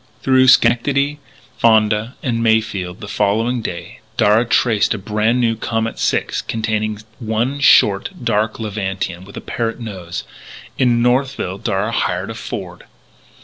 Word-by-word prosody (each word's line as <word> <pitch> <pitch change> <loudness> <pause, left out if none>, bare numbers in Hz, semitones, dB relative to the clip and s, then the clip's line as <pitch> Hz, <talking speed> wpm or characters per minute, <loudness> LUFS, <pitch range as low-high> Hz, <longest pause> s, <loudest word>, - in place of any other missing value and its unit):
Through 130 -1 +4
Schenectady, 140 +4 +3 0.4
Fonda, 110 +1 +3
and 115 -3 -1
Mayfield, 110 -5 0
the 105 - -7
following 105 +4 0
day, 85 -5 -7 0.2
Darragh 110 +3 +3
traced 115 -2 +2
a - - -4
brand 110 +4 0
new 115 -2 +2
Comet 115 0 -3
Six - - 0
containing 110 -1 -2 0.2
one 115 +4 -1
short, 140 - +5
dark 110 +2 0
Levantine 95 -4 -4
with 100 - -12
a - - -5
parrot 115 0 -3
nose. 95 -7 -6 0.6
In 120 -3 +3
Northville 125 -6 0
Darragh 105 +1 -1
hired 90 +2 -1
a - - -5
Ford. 95 -6 -7
110 Hz, 135 wpm, -18 LUFS, 105-120 Hz, 0.6 s, short